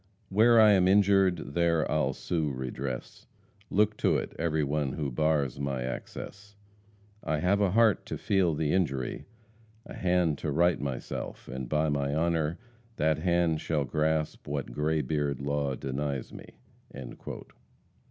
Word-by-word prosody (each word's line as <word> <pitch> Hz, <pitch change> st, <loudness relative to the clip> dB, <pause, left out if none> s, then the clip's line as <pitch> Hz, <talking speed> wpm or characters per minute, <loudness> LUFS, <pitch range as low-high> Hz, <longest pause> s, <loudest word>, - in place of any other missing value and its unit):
"Where 115 Hz, +4 st, +5 dB
I 110 Hz, -1 st, +8 dB
am 95 Hz, -2 st, +4 dB
injured, 95 Hz, -5 st, +3 dB
there 85 Hz, -1 st, +2 dB
I'll 75 Hz, 0 st, +1 dB
sue 80 Hz, -4 st, -2 dB
redress, 65 Hz, 0 st, -5 dB, 0.4 s
Look 105 Hz, +1 st, +2 dB
to -, -, +2 dB
it, -, -, -4 dB
every 80 Hz, -2 st, +1 dB
one 70 Hz, -1 st, -1 dB
who 70 Hz, -4 st, -3 dB
bars 75 Hz, -1 st, 0 dB
my 70 Hz, -3 st, -2 dB
access; 100 Hz, +10 st, -7 dB, 0.7 s
I 80 Hz, -, 0 dB
have 95 Hz, +6 st, +2 dB
a 100 Hz, -, +3 dB
heart 110 Hz, 0 st, +3 dB
to -, -, -4 dB
feel 95 Hz, -5 st, +1 dB
the 75 Hz, -1 st, 0 dB
injury, 70 Hz, -9 st, -1 dB, 0.6 s
A -, -, -10 dB
hand 90 Hz, -5 st, +1 dB
to 80 Hz, -, -3 dB
right 85 Hz, +4 st, +2 dB
myself, 70 Hz, -3 st, -5 dB
and 65 Hz, -1 st, -6 dB
by 75 Hz, 0 st, +1 dB
my 70 Hz, 0 st, -1 dB
honor, 80 Hz, 0 st, 0 dB, 0.4 s
That 80 Hz, -3 st, +1 dB
hand 85 Hz, -2 st, +1 dB
shall 75 Hz, -3 st, -1 dB
grasp 75 Hz, +2 st, -1 dB
what 70 Hz, -3 st, -3 dB
gray 75 Hz, +3 st, 0 dB
beard 70 Hz, -1 st, -1 dB
Law 70 Hz, -1 st, -1 dB
denies 70 Hz, 0 st, -4 dB
me." -, -, -12 dB
80 Hz, 145 wpm, -29 LUFS, 70-90 Hz, 0.7 s, I